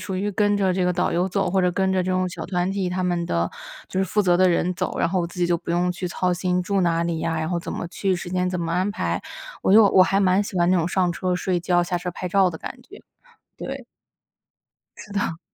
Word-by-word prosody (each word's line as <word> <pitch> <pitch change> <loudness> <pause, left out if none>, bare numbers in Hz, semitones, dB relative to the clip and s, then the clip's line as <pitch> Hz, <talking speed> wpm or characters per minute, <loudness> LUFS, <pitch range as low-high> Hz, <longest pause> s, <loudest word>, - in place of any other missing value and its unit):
属 190 -1 -4
于 200 +2 -1
跟 205 0 +2
着 190 -2 +2
这 185 0 0
个 180 - +2
导 180 +1 0
游 180 +2 +1
走， 195 -1 0
或 190 +1 +2
者 180 0 +2
跟 190 +1 +1
着 185 -1 +1
这 185 - -2
种 185 0 +1
小 165 -2 -6
团 180 0 -1
体 195 -2 -1
他 185 +1 -2
们 175 -1 -1
的 85 - 0 0.4
就 190 - -1
是 - - +2
负 210 +2 +1
责 180 -2 +3
的 185 +1 +4
人 175 +1 +1
走， 180 -1 -3
然 - - +2
后 185 +1 0
我 170 - -1
自 175 +1 -12
己 175 - +2
就 170 -1 +1
不 170 - -7
用 175 +1 +1
去 180 +1 -5
操 180 +1 0
心 180 0 0
住 195 +2 0
哪 170 -2 +1
里 170 -1 -2
呀， 160 0 -1
然 160 +1 -2
后 175 - 0
怎 - - -7
么 - - -4
去、 190 +1 -1
时 175 0 -7
间 180 0 0
怎 180 0 -2
么 165 -1 -2
安 185 +4 +1
排。 205 - -2 0.4
我 - - +3
就 220 +1 +8
我 185 - +6
还 195 +1 +2
蛮 190 +1 +3
喜 200 -2 -6
欢 175 +1 +3
那 185 - +4
种 170 -2 +1
上 180 -1 +1
车 180 +1 -1
睡 180 0 0
觉、 175 0 +2
下 175 0 -2
车 180 0 -4
拍 180 - -6
照 190 +1 +4
的 165 - -6
感 - - -8
觉， - - -14 0.6
对。 - - -6 1.1
是 210 - -11
的。 170 -5 -1
180 Hz, 295 characters per minute, -23 LUFS, 175-190 Hz, 1.1 s, 就